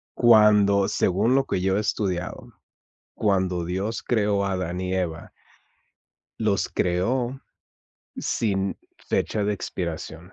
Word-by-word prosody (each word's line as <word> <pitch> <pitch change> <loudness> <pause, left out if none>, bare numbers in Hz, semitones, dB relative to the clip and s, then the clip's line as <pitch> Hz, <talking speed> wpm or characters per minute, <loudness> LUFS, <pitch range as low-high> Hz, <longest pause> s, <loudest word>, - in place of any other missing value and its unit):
Cuando 105 -4 +5
según 105 +8 +2
lo 135 - +2
que 90 - -1
yo 95 +1 +1
he - - +1
estudiado, 95 -4 -3 0.6
cuando 95 -4 0
Dios 95 +6 -3
creó 105 -4 +1
a 100 - -1
Adán 90 -1 -3
y 95 0 -2
Eva 85 -3 -3 1.1
los 105 -3 +1
creó 120 +9 0 0.8
sin 95 -3 -1 0.2
fecha 105 - -1
de 105 +1 +1
expiración. 85 -2 -6
95 Hz, 115 wpm, -24 LUFS, 90-105 Hz, 1.1 s, Cuando